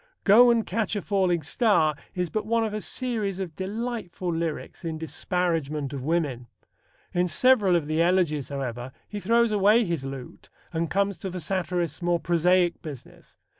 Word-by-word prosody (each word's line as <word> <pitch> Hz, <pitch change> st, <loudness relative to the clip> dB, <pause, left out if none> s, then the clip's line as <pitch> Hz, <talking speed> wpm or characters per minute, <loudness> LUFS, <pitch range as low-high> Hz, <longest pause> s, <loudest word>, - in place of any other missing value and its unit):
Go 235 Hz, +5 st, +7 dB
and 230 Hz, -2 st, +3 dB
Catch 215 Hz, +1 st, -1 dB
a 205 Hz, -, -1 dB
Falling 185 Hz, -5 st, +1 dB
Star 165 Hz, -, +2 dB, 0.2 s
is 180 Hz, -3 st, -2 dB
but 215 Hz, -, -2 dB
one 230 Hz, 0 st, +2 dB
of 215 Hz, -, -4 dB
a 215 Hz, -, -3 dB
series 215 Hz, -8 st, -2 dB
of 175 Hz, -5 st, -5 dB
delightful 195 Hz, -3 st, -4 dB
lyrics 165 Hz, +1 st, -4 dB
in 165 Hz, -1 st, -3 dB
disparagement 160 Hz, -4 st, -2 dB
of 135 Hz, -, -4 dB
women. 140 Hz, -5 st, -1 dB, 0.7 s
In 180 Hz, 0 st, +2 dB
several 210 Hz, -1 st, +4 dB
of 165 Hz, -4 st, +1 dB
the 155 Hz, +2 st, 0 dB
Elegies, 170 Hz, -5 st, +1 dB
however, 130 Hz, -2 st, -5 dB
he 210 Hz, -, -5 dB
throws 235 Hz, +2 st, +3 dB
away 210 Hz, +3 st, +4 dB
his 170 Hz, -6 st, -2 dB
lute 135 Hz, -2 st, -8 dB, 0.2 s
and 165 Hz, 0 st, -1 dB
comes 200 Hz, +2 st, 0 dB
to 190 Hz, -, -4 dB
the 180 Hz, 0 st, -5 dB
satirist's 175 Hz, -2 st, -2 dB
more 175 Hz, 0 st, +1 dB
prosaic 175 Hz, +1 st, +2 dB
business. 150 Hz, -7 st, -11 dB
175 Hz, 170 wpm, -26 LUFS, 155-205 Hz, 0.7 s, Go